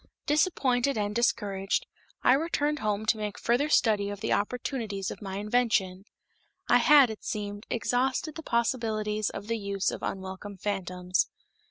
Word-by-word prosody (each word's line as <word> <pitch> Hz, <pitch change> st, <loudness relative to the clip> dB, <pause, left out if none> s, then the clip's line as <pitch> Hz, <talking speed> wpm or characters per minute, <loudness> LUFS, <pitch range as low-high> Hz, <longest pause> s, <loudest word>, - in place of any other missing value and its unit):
Disappointed 280 Hz, -5 st, +2 dB
and 205 Hz, 0 st, -1 dB
discouraged, 200 Hz, -4 st, 0 dB, 0.4 s
I 255 Hz, -, +6 dB
returned 300 Hz, 0 st, 0 dB
home 210 Hz, -1 st, -1 dB
to 220 Hz, -, +2 dB
make 210 Hz, -1 st, -4 dB
a -, -, -9 dB
further 250 Hz, +6 st, +1 dB
study 210 Hz, -7 st, +3 dB
of 205 Hz, -1 st, -6 dB
the -, -, 0 dB
opportunities 210 Hz, -3 st, -2 dB
of -, -, -9 dB
my 195 Hz, -1 st, -5 dB
invention. 205 Hz, -4 st, 0 dB, 0.6 s
I 245 Hz, -, +5 dB
had, 275 Hz, -1 st, +6 dB
it 220 Hz, -, -9 dB
seemed, 205 Hz, -1 st, -4 dB
exhausted 260 Hz, +6 st, 0 dB
the 320 Hz, -, -7 dB
possibilities 220 Hz, -5 st, 0 dB
of 195 Hz, -, -7 dB
the 230 Hz, +1 st, -2 dB
use 200 Hz, -1 st, -1 dB
of -, -, -6 dB
unwelcome 190 Hz, +1 st, -5 dB
phantoms. 185 Hz, -2 st, -1 dB
215 Hz, 155 wpm, -28 LUFS, 200-245 Hz, 0.6 s, I